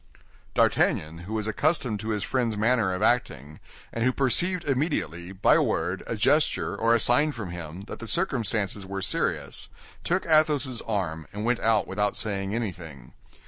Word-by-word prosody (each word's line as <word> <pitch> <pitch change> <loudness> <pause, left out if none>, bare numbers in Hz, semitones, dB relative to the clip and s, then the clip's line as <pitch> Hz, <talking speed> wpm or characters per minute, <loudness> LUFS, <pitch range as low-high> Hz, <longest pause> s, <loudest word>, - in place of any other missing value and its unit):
D'Artagnan, 80 +3 +1
who - - -4
was 105 -1 -2
accustomed 120 -1 0
to 110 +2 -5
his 105 -2 -1
friend's 120 -5 -1
manner 110 -2 +2
of 90 - -2
acting, 75 - 0 0.3
and 115 - -1
who 130 - +3
perceived 175 +8 +1
immediately, 130 - -2
by 95 0 +3
a - - +4
word, 90 +3 -1
a - - -2
gesture, 145 +8 +2
or 115 +1 +3
a - - +2
sign 145 +7 +3
from 105 -8 -6
him, 85 0 -7
that 100 - -9
the 115 - -7
circumstances 115 - -1
were 95 0 -5
serious, - - -1 0.3
took 180 +2 0
Athos's 150 -6 +2
arm, 85 -8 -2
and 105 +2 -5
went 120 0 +1
out 110 -1 +2
without 105 +1 -1
saying 100 -1 -2
anything. 80 - -6
110 Hz, 170 wpm, -26 LUFS, 95-130 Hz, 0.3 s, a